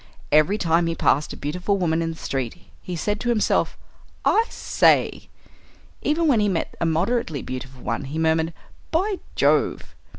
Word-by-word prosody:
Every 155 Hz, +7 st, +4 dB
time 170 Hz, -2 st, +2 dB
he 165 Hz, -, -1 dB
passed 150 Hz, -1 st, +2 dB
a -, -, -8 dB
beautiful 180 Hz, +7 st, -1 dB
woman 165 Hz, -3 st, +1 dB
in 165 Hz, -, -1 dB
the 165 Hz, -, -5 dB
street 130 Hz, -7 st, -3 dB, 0.3 s
he 180 Hz, -, -5 dB
said 205 Hz, +5 st, -1 dB
to 240 Hz, -, -2 dB
himself, 225 Hz, -3 st, +1 dB, 0.5 s
"I 450 Hz, -, +4 dB
say!" -, -, +2 dB, 0.7 s
Even 320 Hz, +3 st, +1 dB
when 255 Hz, -7 st, +4 dB
he 205 Hz, -1 st, +2 dB
met 175 Hz, -4 st, -2 dB
a 170 Hz, -, +2 dB
moderately 165 Hz, -, 0 dB
beautiful 130 Hz, 0 st, -7 dB
one -, -, -2 dB
he 145 Hz, +4 st, -5 dB
murmured, 160 Hz, 0 st, +2 dB, 0.4 s
"By 380 Hz, +4 st, 0 dB, 0.2 s
Jove!" -, -, +1 dB
165 Hz, 165 wpm, -23 LUFS, 155-210 Hz, 0.7 s, Every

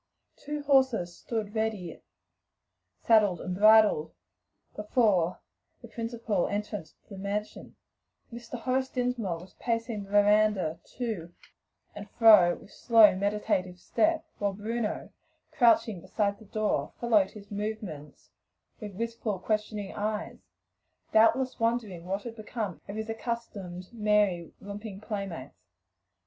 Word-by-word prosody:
Two 295 Hz, 0 st, -5 dB
horses 260 Hz, -11 st, +2 dB
stood 215 Hz, -1 st, -4 dB
ready 220 Hz, -6 st, -3 dB, 1.0 s
saddled 210 Hz, -6 st, +4 dB
and 180 Hz, -, -4 dB
bridled 215 Hz, -5 st, +5 dB, 0.6 s
before 210 Hz, -5 st, +1 dB, 0.4 s
the -, -, -9 dB
principal 230 Hz, -5 st, -2 dB
entrance 205 Hz, -5 st, -4 dB
to -, -, -38 dB
the 195 Hz, -2 st, -9 dB
mansion, 205 Hz, +2 st, -4 dB, 0.6 s
and 235 Hz, -, -7 dB
Mr. 240 Hz, +1 st, -8 dB
Horace 260 Hz, +2 st, 0 dB
Dinsmore 245 Hz, -8 st, -1 dB
was 180 Hz, +3 st, -13 dB
pacing 230 Hz, -3 st, -2 dB
the -, -, -17 dB
veranda 205 Hz, -5 st, +3 dB, 0.2 s
to 205 Hz, -9 st, -4 dB, 0.6 s
and 205 Hz, 0 st, -9 dB
fro 210 Hz, -7 st, +7 dB
with -, -, -16 dB
slow, 225 Hz, -5 st, +6 dB
meditative 190 Hz, -2 st, -1 dB
step, 320 Hz, -, +1 dB
while 200 Hz, -1 st, 0 dB
Bruno, 215 Hz, +2 st, -3 dB, 0.4 s
crouching 230 Hz, -, +3 dB
beside 200 Hz, +1 st, -1 dB
the 220 Hz, -, -14 dB
door, 215 Hz, +1 st, -1 dB
followed 215 Hz, -5 st, +3 dB
his 205 Hz, -1 st, -13 dB
movements 205 Hz, -8 st, -6 dB, 0.5 s
with 210 Hz, -3 st, -8 dB
wistful, 230 Hz, -1 st, -3 dB
questioning 210 Hz, +1 st, -2 dB
eyes, 215 Hz, +1 st, -3 dB, 0.7 s
doubtless 255 Hz, +4 st, +4 dB
wondering 225 Hz, -7 st, -1 dB
what 195 Hz, +2 st, -3 dB
had 235 Hz, -2 st, -7 dB
become 215 Hz, -4 st, -5 dB
of 200 Hz, -, -5 dB
his 220 Hz, 0 st, -4 dB
accustomed 220 Hz, -5 st, -5 dB
merry, 210 Hz, -6 st, +1 dB
romping 205 Hz, 0 st, -8 dB
play 205 Hz, -2 st, -4 dB
mates. 130 Hz, -, -11 dB
210 Hz, 125 wpm, -29 LUFS, 195-230 Hz, 1.0 s, fro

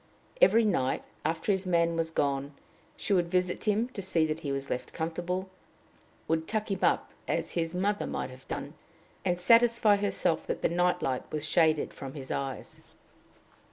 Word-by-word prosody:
Every 230 Hz, -, +6 dB
night, 135 Hz, -11 st, +1 dB, 0.2 s
after 160 Hz, +6 st, 0 dB
his 190 Hz, -1 st, -1 dB
man 170 Hz, -1 st, +2 dB
was 165 Hz, -1 st, 0 dB
gone, 140 Hz, -2 st, -1 dB, 0.4 s
she 205 Hz, -, -1 dB
would 175 Hz, -3 st, +3 dB
visit 180 Hz, +2 st, 0 dB
him 215 Hz, +2 st, +2 dB
to 210 Hz, -, -6 dB
see 175 Hz, -4 st, +2 dB
that 155 Hz, 0 st, -2 dB
he 145 Hz, -4 st, -4 dB
was 135 Hz, 0 st, -3 dB
left 125 Hz, -, -3 dB
comfortable, 175 Hz, +3 st, -3 dB, 0.8 s
would 160 Hz, 0 st, 0 dB
tuck 215 Hz, -1 st, -1 dB
him 195 Hz, -, -1 dB
up -, -, +2 dB, 0.2 s
as -, -, -1 dB
his 165 Hz, 0 st, -2 dB
mother 205 Hz, +3 st, 0 dB
might -, -, -3 dB
have 130 Hz, 0 st, -14 dB
done, -, -, -5 dB, 0.5 s
and 180 Hz, -2 st, +1 dB
satisfy 230 Hz, +2 st, +5 dB
herself 200 Hz, -5 st, 0 dB
that -, -, -3 dB
the -, -, +3 dB
night 175 Hz, +1 st, +1 dB
light 130 Hz, -1 st, -2 dB
was 150 Hz, 0 st, -2 dB
shaded 160 Hz, -1 st, +2 dB
from 135 Hz, +1 st, -8 dB
his 135 Hz, -2 st, -7 dB
eyes. 135 Hz, -3 st, -4 dB
170 Hz, 175 wpm, -29 LUFS, 155-195 Hz, 0.8 s, Every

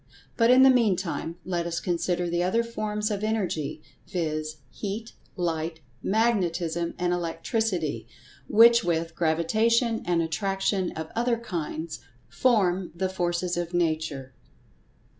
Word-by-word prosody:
But, 230 Hz, 0 st, +4 dB
in 255 Hz, +1 st, +7 dB
the 265 Hz, -, +8 dB
meantime, 190 Hz, -8 st, 0 dB
let 175 Hz, -2 st, -1 dB
us 170 Hz, 0 st, -2 dB
consider 175 Hz, 0 st, -1 dB
the 175 Hz, 0 st, 0 dB
other 185 Hz, +6 st, +2 dB
forms 215 Hz, -2 st, -2 dB
of 205 Hz, 0 st, -2 dB
Energy, 185 Hz, -9 st, -2 dB, 0.2 s
viz., 155 Hz, -3 st, -2 dB, 0.2 s
Heat, 215 Hz, +3 st, -5 dB, 0.2 s
Light, 165 Hz, -2 st, -2 dB, 0.2 s
Magnetism 175 Hz, -6 st, 0 dB
and 175 Hz, 0 st, 0 dB
Electricity, 175 Hz, 0 st, -2 dB, 0.4 s
which 235 Hz, +1 st, +7 dB
with 165 Hz, -1 st, -1 dB
Gravitation 220 Hz, +9 st, +2 dB
and 170 Hz, -1 st, +1 dB
Attraction 195 Hz, +2 st, -1 dB
of 160 Hz, 0 st, -6 dB
other 235 Hz, +1 st, +1 dB
kinds, 170 Hz, -6 st, -4 dB, 0.3 s
form 190 Hz, -, +2 dB
the 190 Hz, +2 st, -1 dB
Forces 175 Hz, -1 st, -1 dB
of 175 Hz, 0 st, -3 dB
Nature. 155 Hz, -6 st, -1 dB
180 Hz, 120 wpm, -26 LUFS, 165-215 Hz, 0.4 s, the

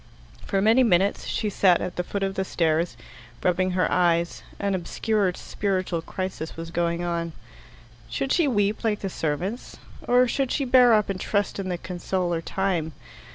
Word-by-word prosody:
For 195 Hz, 0 st, +1 dB
many 225 Hz, +4 st, +5 dB
minutes 200 Hz, -4 st, +2 dB
she 210 Hz, -2 st, -1 dB
sat 185 Hz, -3 st, +4 dB
at 180 Hz, -, -4 dB
the 180 Hz, -, -1 dB
foot 200 Hz, +2 st, -3 dB
of 195 Hz, 0 st, -1 dB
the 190 Hz, -, -1 dB
stairs, 165 Hz, -6 st, 0 dB, 0.5 s
rubbing 185 Hz, +1 st, +1 dB
her 180 Hz, -, +3 dB
eyes. 170 Hz, -1 st, +2 dB, 0.2 s
An 200 Hz, -1 st, -1 dB
obscure 190 Hz, +2 st, 0 dB
spiritual 185 Hz, -4 st, -2 dB
crisis 185 Hz, -2 st, -5 dB
was 165 Hz, 0 st, -6 dB
going 170 Hz, 0 st, 0 dB
on. 170 Hz, -1 st, -2 dB, 0.8 s
Should 270 Hz, -, -2 dB
she 340 Hz, -4 st, +3 dB
weep 205 Hz, -4 st, +1 dB
like 215 Hz, -2 st, 0 dB
the 195 Hz, -, -2 dB
servants? 175 Hz, -, -3 dB, 0.3 s
Or 250 Hz, +1 st, +5 dB
should 265 Hz, +1 st, -1 dB
she 280 Hz, -, 0 dB
bear 245 Hz, -2 st, +6 dB
up 210 Hz, -2 st, +1 dB
and 185 Hz, -, -5 dB
trust 205 Hz, -1 st, -1 dB
in 190 Hz, -1 st, -3 dB
the 180 Hz, -, -1 dB
consoler 175 Hz, -1 st, -2 dB
Time? 175 Hz, -3 st, -1 dB
185 Hz, 170 wpm, -25 LUFS, 170-210 Hz, 0.8 s, bear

